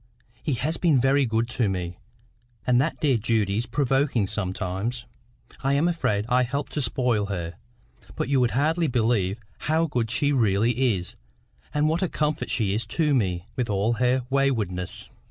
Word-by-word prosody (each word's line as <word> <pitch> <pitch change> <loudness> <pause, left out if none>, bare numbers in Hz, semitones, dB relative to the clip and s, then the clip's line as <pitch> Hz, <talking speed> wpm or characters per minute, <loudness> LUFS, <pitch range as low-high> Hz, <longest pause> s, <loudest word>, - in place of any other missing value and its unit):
He 150 - -1
has 155 +7 -1
been 160 -7 +3
very 135 +1 +3
good 115 +1 0
to 120 -3 0
me; 90 -2 -4 0.7
and 125 0 +4
that 155 +4 -1
dear 140 -5 +3
Judy 105 -3 +1
is 120 - -3
provoking 135 -3 +1
sometimes. 100 +4 -3 0.6
I 135 +1 +1
am 150 +4 +3
afraid 105 -12 0
I 125 +1 +3
help 135 +4 -2
to 150 - -2
spoil 120 -4 0
her; 85 -4 -4 0.6
but - - -2
you 135 -1 +2
would 125 -2 +3
hardly 160 +4 +2
believe 115 -5 +1 0.3
how 160 +1 +3
good 120 -7 -1
she 145 +4 +1
really 115 +1 +2
is, 90 0 -8 0.6
and 150 +1 +1
what 165 +3 +1
a 185 - +1
comfort 150 0 -1
she 105 -5 +1
is 110 +1 -2
to 150 +5 +1
me—with 110 +1 -1
all 105 +3 +1
her 125 +2 +1
waywardness." 110 -10 -1
120 Hz, 170 wpm, -25 LUFS, 105-140 Hz, 0.7 s, and